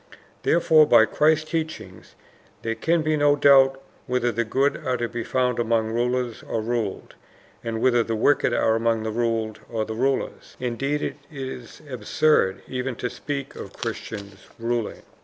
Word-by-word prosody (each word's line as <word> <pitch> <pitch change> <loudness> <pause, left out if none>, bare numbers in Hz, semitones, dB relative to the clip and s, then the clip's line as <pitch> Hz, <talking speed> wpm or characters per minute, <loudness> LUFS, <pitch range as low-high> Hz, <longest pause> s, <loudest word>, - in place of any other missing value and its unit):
Therefore 160 -2 +4
by - - +7
Christ's 155 +1 +2
teaching 155 - -4 0.6
there 115 - -1
can 165 +6 +1
be 155 0 +1
no 145 -1 +4
doubt 135 -2 +5 0.3
whether 125 -1 +1
the 115 +1 0
good 135 +5 +1
are 130 -3 0
to 120 - -1
be 120 0 -5
found 125 -1 0
among 115 -1 +1
rulers 120 0 -1
or 115 - -3
ruled, 110 -2 -3 0.5
and 115 -1 -3
whether 120 -2 +4
the 115 0 -2
wicked 130 +3 +3
are 110 -1 +2
among 115 0 +1
the 110 - -2
ruled 115 -1 -1
or 110 -2 -2
the 110 - -5
rulers. 130 +4 -2
Indeed 135 +4 -2
it - - -3
is 130 -3 -8
absurd 125 -7 +1
even 130 0 -3
to 125 +1 -4
speak 140 -2 -5
of - - -9
Christians 100 -1 -7
ruling. 115 -1 -3
120 Hz, 160 wpm, -24 LUFS, 115-140 Hz, 0.6 s, by